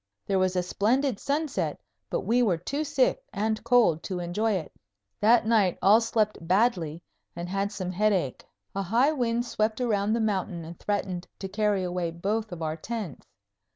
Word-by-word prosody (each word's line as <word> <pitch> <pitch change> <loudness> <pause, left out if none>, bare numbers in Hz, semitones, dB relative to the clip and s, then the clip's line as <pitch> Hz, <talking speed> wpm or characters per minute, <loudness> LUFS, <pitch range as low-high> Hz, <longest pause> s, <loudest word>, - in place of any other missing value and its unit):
There 195 -1 +1
was 185 0 +1
a 180 - +1
splendid 230 +6 +1
sunset, 290 0 -1 0.3
but - - -1
we 240 +2 +2
were 195 -8 +2
too 280 - -3
sick 290 - +1
and 220 +1 -1
cold 220 -11 +4
to 185 - -3
enjoy 180 +6 0
it. 180 -5 -3 0.5
That 225 +2 +5
night 215 -6 +3
all 210 +4 +6
slept 220 -2 0
badly 175 -3 +1 0.3
and 170 +1 -5
had 195 +2 -1
some 185 -3 -4
headache. 185 -8 0 0.3
A 195 - -1
high 235 - +3
wind 240 -4 0
swept 220 -1 -1
around 215 -4 +1
the 230 - +1
mountain 190 -6 -1
and 170 +1 -10
threatened 190 -3 -2
to 195 - -5
carry 205 -1 +1
away 180 -1 -1
both 205 +6 -2
of 170 -2 -5
our 155 0 -1
tents. 210 - -6
205 Hz, 175 wpm, -27 LUFS, 180-230 Hz, 0.5 s, all